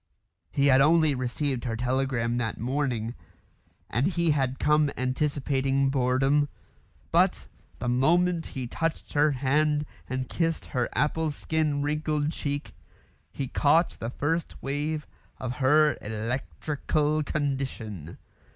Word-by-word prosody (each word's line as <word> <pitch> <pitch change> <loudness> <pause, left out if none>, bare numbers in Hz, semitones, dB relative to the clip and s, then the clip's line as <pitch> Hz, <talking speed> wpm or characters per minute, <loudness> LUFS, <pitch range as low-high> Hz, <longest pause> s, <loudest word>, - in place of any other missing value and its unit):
He 140 - +1
had 135 -1 +6
only 155 0 +5
received 130 0 -2
her 115 -2 -1
telegram 125 -1 0
that 110 -3 -2
morning, 120 -2 -1 0.7
and 125 - +1
he 170 -3 +2
had 135 -3 0
come 150 -1 +3
anticipating 135 0 +1
boredom; 135 +2 +2 0.6
but - - +3 0.3
the 120 - -4
moment 165 +7 +2
he 130 -2 -5
touched 165 +6 -3
her 150 +1 +4
hand 150 +2 +1 0.2
and 130 0 -2
kissed 165 -2 -1
her 125 -2 -1
apple 155 +3 +1
skin 150 -1 -1
wrinkled 150 0 0
cheek, 145 -2 -4 0.6
he 135 +9 -4
caught 155 +6 +3
the 115 - -5
first 160 +6 -2
wave 150 +2 -2 0.3
of 125 -1 -4
her 150 +3 +4
electrical 130 - -1
condition. 130 - -3
140 Hz, 120 wpm, -27 LUFS, 125-150 Hz, 0.7 s, had